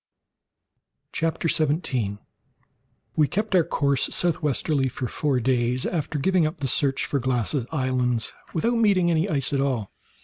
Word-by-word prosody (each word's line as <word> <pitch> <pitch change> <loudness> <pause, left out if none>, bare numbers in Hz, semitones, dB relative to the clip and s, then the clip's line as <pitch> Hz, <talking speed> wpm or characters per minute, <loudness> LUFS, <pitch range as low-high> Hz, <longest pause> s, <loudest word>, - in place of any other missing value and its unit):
CHAPTER 165 +1 -1
17 140 - 0 1.0
We 150 -2 +3
kept 210 +5 -2
our 180 -3 +5
course 140 -4 0
southwardly 150 -4 +1
for 125 +1 -4
four 140 +1 0
days 125 0 +1
after 155 -2 -2
giving 175 +2 +2
up 155 - -6
the 140 -2 -3
search 135 +1 +1
for 140 - -1
Glass's 125 0 -1
islands, 125 -5 0 0.2
without 235 +9 0
meeting 200 -5 +3
with 175 - +2
any 165 +4 +1
ice 140 -3 0
at 135 - +1
all. 125 -7 -1
140 Hz, 145 wpm, -24 LUFS, 130-165 Hz, 1.0 s, our